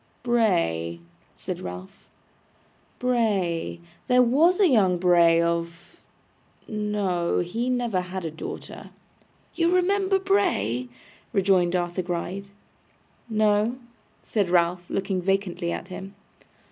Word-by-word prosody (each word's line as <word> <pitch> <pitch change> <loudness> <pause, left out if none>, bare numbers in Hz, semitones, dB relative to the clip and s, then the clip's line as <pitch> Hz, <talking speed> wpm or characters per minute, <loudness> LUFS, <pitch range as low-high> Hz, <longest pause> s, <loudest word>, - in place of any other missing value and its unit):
'Bray,' 85 - +1 0.4
said - - -6
Ralph. 90 +1 -9 0.9
'Bray 205 -10 0 0.3
there 250 -1 +5
was 315 - +3
young 215 - +4
Bray 170 -2 +5
of 170 0 -3 0.7
no, 205 -5 -1
he 225 +8 -2
never 240 -7 0
had 180 0 -6
a 160 - -3
daughter.' 160 - -8 0.6
'You 335 0 +1
remember 385 +1 +2
Bray?' 370 - 0 0.4
rejoined 185 -3 +3
Arthur 175 +1 -1
Gride. 180 +3 -4 0.8
'No,' 215 +1 +2 0.5
said 205 -5 -1
Ralph, 175 0 +1
looking 195 -1 -1
vacantly 185 -2 -1
at 180 - -5
him. 195 +2 -8
190 Hz, 100 wpm, -25 LUFS, 175-235 Hz, 0.9 s, there